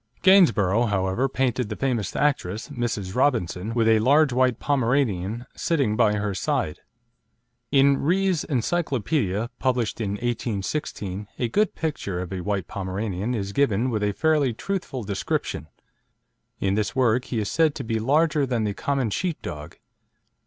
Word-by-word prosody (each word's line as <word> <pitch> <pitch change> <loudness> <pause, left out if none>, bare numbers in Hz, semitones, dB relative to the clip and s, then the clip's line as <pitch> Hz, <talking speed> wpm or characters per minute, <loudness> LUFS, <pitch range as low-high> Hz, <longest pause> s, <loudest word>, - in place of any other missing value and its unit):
Gainsborough, 120 - +5
however, 100 +5 0
painted 125 -3 0
the 105 - -3
famous 125 -5 -1
actress, 110 -8 0
Mrs. 120 -8 -3
Robinson, 115 -7 0
with 115 -2 +2
a 110 -1 +5
large 140 +4 +4
white 125 -2 +2
Pomeranian 120 -6 0
sitting 135 -10 0
by 110 -2 +3
her 105 -1 -1
side. 75 -4 -1 0.9
In 140 0 +5
Rees' 185 +1 +1
Encyclopedia, 125 - -1
published 125 -4 0
in 100 -2 -1
1816, 105 -2 -3
a 120 - -1
good 210 - +1
picture 145 - -3
of 90 +1 -5
a 95 - -3
white 100 -2 -2
Pomeranian 100 +3 -3
is 100 -2 -3
given 125 -2 +1
with 110 -2 -1
a 105 0 +1
fairly 150 -2 +2
truthful 175 - -4
description. 95 -6 -3 0.9
In 95 0 +1
this 105 0 -1
work 125 -1 +2
he 120 - -4
is 105 -2 -1
said 160 -2 +2
to 140 - -4
be 115 -1 -1
"larger 145 +4 +2
than 120 -3 0
the 105 -1 -1
common 135 0 -1
sheep 175 - -2
dog." 75 +3 -7
120 Hz, 150 wpm, -24 LUFS, 100-140 Hz, 0.9 s, Gainsborough